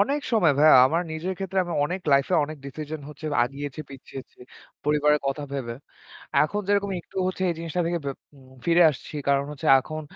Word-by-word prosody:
অনেক 280 +8 +1
সময় 175 -9 +4
ভাইয়া। 155 +1 +7
আমার 165 +5 0
নিজের 170 +4 -3
ক্ষেত্রে 195 0 -2
আমি 175 - -5
অনেক 180 +5 -3
লাইফে 140 0 +3
অনেক 155 +2 -8
ডিসিশন 155 +2 -6
হচ্ছে 150 +1 -9 0.2
আগিয়েছি 140 +3 -6
পিছিয়েছি। 135 -1 -11 0.5
পরিবারের 150 0 +3
কথা 135 +2 -2
ভেবে। 125 -4 -4 0.7
এখন 205 +7 -2
যেরকম 200 0 +1
একটু 170 - -20
হচ্ছে 185 0 -3
এই - - -2
জিনিসটা 165 +1 -3
থেকে 170 0 -1
বে - - 0 0.5
ফিরে 170 +1 +5
আসছি। 150 +2 -9
কারণ 140 0 +3
হচ্ছে 145 - -7
এখন 155 +3 -6
155 Hz, 175 wpm, -25 LUFS, 140-175 Hz, 0.7 s, ভাইয়া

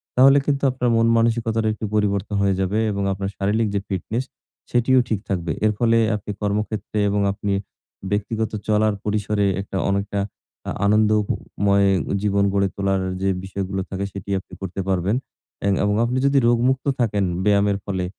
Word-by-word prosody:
তাহলে 135 +2 +7
কিন্তু 140 -1 0
আপনার 125 -1 -1
মন 115 0 +3
মানসিকতাটা 115 -1 +1
একটু 110 - -5
পরিবর্তন 105 0 0
হয়ে 100 -1 +2
যাবে 95 +2 0
এবং 100 0 -2
আপনার 95 0 -3
শারীরিক 105 +3 +1
যে - - +2
ফিটনেস, 105 +5 -2 0.5
সেটিও 125 +2 +4
ঠিক 110 - 0
থাকবে। 85 -4 -1
এর 110 - +4
ফলে 115 0 +3 0.2
আপনি 105 0 -5
কর্মক্ষেত্রে 105 +1 -2
এবং 100 0 +1
আপনি 100 0 -2 0.6
ব্যক্তিগত 110 +2 -1 0.2
চলার 110 0 +3
পরিসরে 105 -1 0 0.2
একটা 100 -1 -5
অনেকটা, 100 +1 -1 0.5
আ - - -1
আনন্দ 105 +1 +4
ও - - +2 0.4
ময় 100 0 +4 0.3
জীবন 100 -1 +2
গড়ে 100 -1 +2
তোলার 95 -1 0 0.2
যে 95 - +1
বিষয়গুলো 95 0 -3
থাকে, 100 0 -3
সেটি 100 0 -8
আপনি 95 - -18
করতে 95 0 -4
পারবেন। 95 +3 +1 0.5
এং - - +3
এবং 105 0 +2
আপনি 120 +2 0
যদি 140 0 +3
রোগমুক্ত 125 +3 +2
থাকেন 105 -4 +1 0.2
ব্যায়ামের 100 0 +3
ফলে 95 -2 -2
105 Hz, 165 wpm, -22 LUFS, 100-110 Hz, 0.6 s, তাহলে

